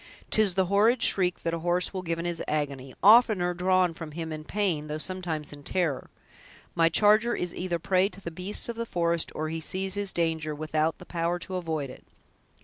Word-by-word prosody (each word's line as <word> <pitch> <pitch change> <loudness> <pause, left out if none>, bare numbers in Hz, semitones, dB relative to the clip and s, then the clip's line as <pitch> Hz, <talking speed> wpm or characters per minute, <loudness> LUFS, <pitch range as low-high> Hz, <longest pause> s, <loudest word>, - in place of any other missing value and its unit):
'Tis 210 -5 +3
the 190 -1 +3
horrid 215 +6 +3
shriek 180 -2 +3
that 165 - -1
a 170 - -2
horse 175 +3 -1
will 185 - -3
give 165 -2 -2
in 170 - -4
his 170 -1 -2
agony; 140 -3 -3
oftener 210 -4 +6
drawn 180 0 +2
from 160 -2 -8
him 165 0 -5
in 155 0 -6
pain, 175 -5 -1
though 150 0 -3
sometimes 160 -3 -4
in 145 - -11
terror. 160 -2 -1 0.6
My 165 0 +4
charger 215 +5 +4
is 180 -1 -2
either 180 -1 -2
a - - -3
prey 185 +3 +2
to 195 - -13
the 170 - -6
beasts 185 +5 -3
of 235 - -4
the 230 0 -3
forest, 170 -3 0
or 155 0 -2
he 165 0 -4
sees 190 +4 -2
his 205 -1 -1
danger, 160 -2 -1
without 155 +1 -1
the 180 - -13
power 170 0 -1
to 185 +2 -7
avoid 160 -6 -3
it. - - -14
175 Hz, 215 wpm, -27 LUFS, 160-190 Hz, 0.6 s, oftener